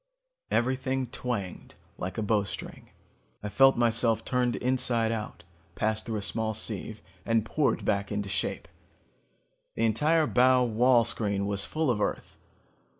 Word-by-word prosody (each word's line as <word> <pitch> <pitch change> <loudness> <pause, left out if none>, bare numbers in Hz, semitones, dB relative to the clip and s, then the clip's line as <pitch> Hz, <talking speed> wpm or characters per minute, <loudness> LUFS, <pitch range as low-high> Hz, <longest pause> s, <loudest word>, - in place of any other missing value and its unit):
"Everything 130 +1 0
twanged 120 -6 -5 0.2
like 95 +4 -5
a 110 - -1
bowstring. 105 -1 -3 0.5
I 105 - -3
felt 135 +4 +5
myself 115 -1 +1
turned 125 -1 +1
inside 125 -3 0
out, 110 -6 -5 0.3
passed 110 +2 -1
through 115 - -2
a 105 - -3
small 110 +1 -2
sieve, 110 0 -4 0.2
and 115 0 +1
poured 150 +5 0
back 100 +1 0
into 100 -1 -2
shape. 100 +1 -3 1.1
The 115 - +1
entire 150 +9 +3
bow 125 -1 +4
wall 120 +1 +3
screen 100 -3 -1
was 100 -1 -1
full 155 -4 0
of 105 -3 -2
Earth. - - -3
115 Hz, 140 wpm, -28 LUFS, 105-125 Hz, 1.1 s, felt